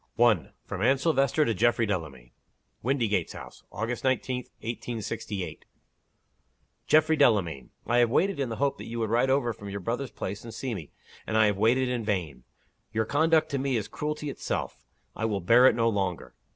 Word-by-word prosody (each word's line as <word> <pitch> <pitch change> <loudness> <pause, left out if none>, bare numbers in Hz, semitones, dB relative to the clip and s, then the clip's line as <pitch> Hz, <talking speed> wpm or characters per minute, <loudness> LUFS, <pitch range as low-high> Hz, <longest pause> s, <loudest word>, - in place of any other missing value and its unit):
1. 110 - +3
From - - -5
Anne 130 +4 +4
Silvester 150 0 +2
to 115 - +1
Geoffrey 120 +2 +2
Delamayn. 75 - -4 0.5
WINDYGATES 115 - 0
HOUSE. - - -11
August 115 +3 -3
19, 130 -1 0 0.2
1868. 110 -4 -5 1.2
"GEOFFREY 155 +1 +4
DELAMAYN, 95 - +2 0.2
I 120 +2 +2
have 120 -1 +4
waited 190 +7 +1
in 135 -3 -1
the 115 - -3
hope 140 +2 0
that - - -8
you 115 - -5
would 110 -2 -1
ride 120 +3 +3
over 130 -3 +2
from 100 -1 -9
your 100 +1 -4
brother's 120 +7 -3
place, 100 +2 -6
and 115 - -8
see 130 -3 -3
me 85 -9 -7 0.4
and 110 - 0
I 110 - +6
have 105 -2 +1
waited 125 +4 +3
in 125 -2 -2
vain. 90 - -3 0.5
Your 110 0 0
conduct 160 +5 +3
to 140 - 0
me 135 -2 0
is 105 -2 -3
cruelty 150 +4 -4
itself; 60 - -4 0.3
I 115 - -2
will 105 -3 0
bear 115 +8 +6
it 115 - +4
no 115 -1 +2
longer. 95 -5 -2
115 Hz, 185 wpm, -27 LUFS, 105-130 Hz, 1.2 s, I